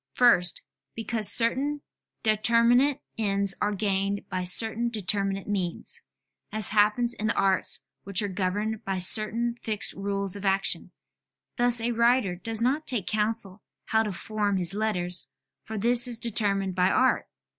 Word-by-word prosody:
First, 180 -8 +2 0.3
because 225 -2 +2
certain 275 +6 +1 0.4
determinate 235 +5 +2 0.2
ends 200 -2 +1
are 210 - 0
gained 200 0 -2
by 185 -1 -3
certain 225 +5 +3
determinate 195 -2 -3
means: 185 -5 -3 0.5
as 215 -1 +2
happens 215 +3 +2
in 215 - -4
the 225 - -1
arts 190 -6 +3 0.2
which 195 -1 +1
are - - -2
governed 205 +3 -3
by 195 -1 -3
certain 225 +5 +3
fixed 215 -2 -1
rules 200 -1 -1
of 200 - -9
action; 195 0 0 0.7
thus 240 -1 +3
a 235 +1 -2
writer 235 -4 +1
does 225 +5 -1
not 285 +5 -1
take 235 -8 -1
counsel 210 -2 -2 0.3
how 220 - +2
to 215 -2 -3
form 205 +2 -3
his 175 -1 -2
letters, 180 -4 0 0.4
for 220 - -7
this 240 +4 +4
is 240 -2 +2
determined 200 -4 -1
by 180 +1 +1
art. 260 - +1
210 Hz, 145 wpm, -25 LUFS, 195-230 Hz, 0.7 s, this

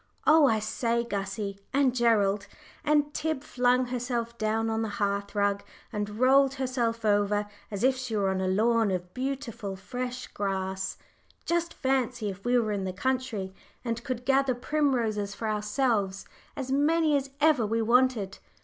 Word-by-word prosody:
Oh, 310 -2 +7
I 225 - +3
say, 230 +2 0
Gussie 200 -2 -4 0.2
and 275 -3 +3
Gerald" 210 -4 +2 0.4
and 295 0 +2
Tib 315 -3 -2
flung 250 -2 +2
herself 240 -2 -2
down 220 +1 0
on 225 0 0
the 225 - -1
hearth 200 0 -1
rug, 200 0 +1 0.3
and 210 0 -3
rolled 270 +1 +5
herself 240 -4 -1
over, 205 0 +2 0.2
as 205 0 -4
if 260 0 +4
she 250 -3 -4
were 200 -2 +1
on 190 0 -1
a 190 - 0
lawn 220 +3 +3
of 180 -1 -3
beautiful 250 -6 -4
fresh 250 +5 -5
grass 190 -1 -3 0.5
"just 340 0 0
fancy 250 -5 0
if 195 +1 -11
we 245 +1 +3
were 220 -3 +1
in 200 -2 -1
the 185 -1 -3
country, 235 -4 -2 0.3
and 230 0 -2
could 250 -1 -4
gather 270 -1 +3
primroses 240 -7 0
for 225 - -4
ourselves 210 -2 0 0.3
as 265 -2 -4
many 305 +2 +3
as 275 -1 -1
ever 300 -5 +4
we 225 +2 0
wanted. 235 -3 +2
230 Hz, 160 wpm, -28 LUFS, 205-260 Hz, 0.5 s, Oh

